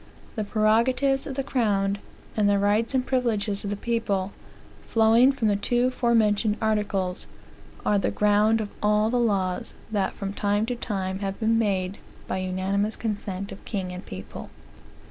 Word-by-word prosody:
The 215 - -1
prerogatives 235 +6 +2
of 270 - -5
the 275 - -1
crown, 205 -6 0 0.4
and 210 -2 +3
the 200 - +3
rights 210 +5 +1
and 255 -1 +1
privileges 225 -6 0
of 200 - -3
the 205 - -1
people, 205 -3 -1 0.6
flowing 230 +3 +5
from 255 -5 -1
the 205 - +3
two 245 +5 +1
fore 235 -2 +1
mentioned 210 -1 +2
articles, 210 -4 -1 0.6
are 205 - +3
the - - 0
ground 210 +2 +3
of 210 - -4
all 210 +1 +3
the 245 - +2
laws 195 -6 0 0.2
that 200 -3 0
from 195 0 -4
time 205 +1 +1
to 245 +1 -2
time 190 -5 -3
have 195 -1 -4
been 225 0 +2
made 195 -3 -1 0.3
by - - -2
unanimous 190 +3 -1
consent 200 -3 -4
of 195 - -10
king 190 -4 -3
and 180 0 -7
people. 95 +1 -8
210 Hz, 165 wpm, -25 LUFS, 200-230 Hz, 0.6 s, flowing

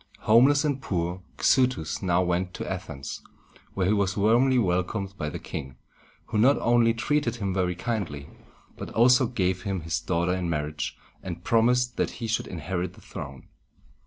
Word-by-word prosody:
Homeless 135 +7 +5
and 140 -2 -1
poor, 90 -4 -2 0.2
Xuthus 125 - +2
now 90 -1 +2
went 90 +1 -1
to - - -5
Athens, 80 -7 -6 0.5
where 95 - +1
he 100 - +3
was 100 -2 0
warmly 120 +6 +4
welcomed 95 -1 0
by 75 -5 -3
the - - -5
king, 65 -1 -7 0.5
who 105 - -1
not 135 +6 +5
only 120 -1 +3
treated 120 +1 0
him 100 -5 -2
very 90 -2 0
kindly, 90 -9 -3 0.5
but - - -7
also 125 +2 +5
gave 95 -6 -1
him 95 -1 -3
his 85 +1 -2
daughter 85 +2 0
in 90 -2 -2
marriage, 75 -1 -3 0.2
and 85 -2 -7
promised 125 +2 +2
that - - 0
he 120 - -4
should 110 0 -1
inherit 90 +2 -4
the - - -17
throne. 65 -2 -8
95 Hz, 165 wpm, -26 LUFS, 85-115 Hz, 0.5 s, Homeless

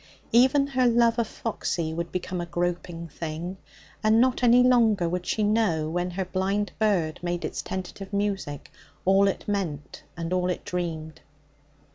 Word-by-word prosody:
Even 265 +4 +5
her 260 -3 +2
love 235 0 +3
of 230 - +1
Foxy 170 -9 -3
would 170 +1 -4
become 180 0 -3
a 175 - -5
groping 175 0 -3
thing, 165 +4 -5 0.5
and 215 +1 +5
not 255 +1 +3
any 245 0 +6
longer 225 -7 +4
would 180 +1 -3
she 215 - 0
know, 205 -8 +2
when 175 +1 -1
her 185 +1 -3
blind 195 +3 -1
bird 185 -8 +1
made 175 0 -2
its - - -3
tentative 190 +1 -6
music, 200 -8 -2 0.3
all 195 +2 +5
it 195 - -2
meant 175 -8 -3 0.2
and 165 +1 -3
all 180 0 +1
it 180 - -3
dreamed. 160 -3 -4
185 Hz, 160 wpm, -26 LUFS, 170-215 Hz, 0.5 s, any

